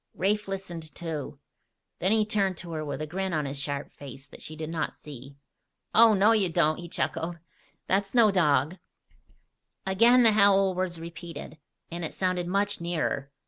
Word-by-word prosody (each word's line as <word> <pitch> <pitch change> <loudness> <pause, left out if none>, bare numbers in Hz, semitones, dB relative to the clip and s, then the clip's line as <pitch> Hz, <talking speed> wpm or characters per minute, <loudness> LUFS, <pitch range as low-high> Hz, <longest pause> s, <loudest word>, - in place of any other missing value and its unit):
Rafe 210 +3 0
listened, 175 -5 -6
too. 160 -5 -5 0.6
Then 190 - +1
he 220 -1 +3
turned 195 -4 0
to 170 0 -7
her 155 -1 -3
with 145 0 -4
a - - -2
grin 190 +3 -3
on 155 -2 0
his 140 0 -5
sharp 140 0 -4
face 140 -1 -11
that - - -13
she 155 - -8
did 155 0 -6
not 165 -1 -3
see. 140 -1 -11 0.6
"Oh, 225 -1 +7
no, 205 +3 +4
you 210 -5 +3
don't," 155 -1 +2
he 175 -1 -8
chuckled. 165 +1 -2 0.5
"That's 195 +3 -1
no 225 -4 +6
dog." 155 -2 +2 1.1
Again 235 +6 +5
the 225 - +7
howl 200 -2 +4
was 180 -2 -3
repeated, 165 -1 -9 0.3
and 170 +1 -5
it 160 - -5
sounded 185 -2 -1
much 200 +1 0
nearer. 160 -5 -2
175 Hz, 175 wpm, -27 LUFS, 155-195 Hz, 1.1 s, Oh